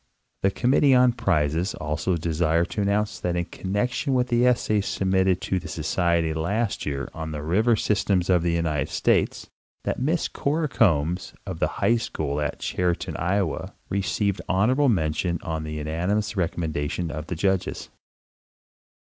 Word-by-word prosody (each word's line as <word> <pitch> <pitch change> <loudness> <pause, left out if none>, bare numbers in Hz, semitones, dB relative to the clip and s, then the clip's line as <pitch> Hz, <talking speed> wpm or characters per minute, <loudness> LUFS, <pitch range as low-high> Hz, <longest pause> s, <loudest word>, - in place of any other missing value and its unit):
The 95 - +3
Committee 130 +6 +3
on 125 0 +6
Prizes 85 -2 0
also 80 +4 -1
desire 80 +1 +1
to 105 - -3
announce 100 0 0
that 90 -1 -1
in 85 0 0
con 95 - -7
nection 125 +6 0
with 125 -1 +1
the 120 0 +3
essays 105 -4 +1
submitted 95 -1 +1
to 95 - -1
the 90 - -9
Society 80 +1 0
last 100 +6 -1
year 70 -1 -2
on 80 0 -5
the 75 -1 -5
river 110 +9 +3
systems 100 -4 +1
of 90 -2 +4
the 85 0 +1
United 80 -3 0
States - - +1 0.3
that - - -2
Miss 160 +5 +1
Cora 155 +2 -1
Combs, 90 - +1
of 90 -4 -5
the - - +2 0.2
high 120 - +4
school 75 -9 -3
at 75 - -2
Chariton, 90 -1 -1
[owa, 90 +1 -1 0.2
received 100 0 0
honorable 125 +10 +3
mention 85 -2 0
on 80 -1 -3
the 75 0 -5
unanimous 90 +8 -1
recommendation 80 -2 -2
of 75 +1 -6
the 90 - -3
judges. 95 +1 -1
90 Hz, 160 wpm, -25 LUFS, 80-105 Hz, 0.3 s, on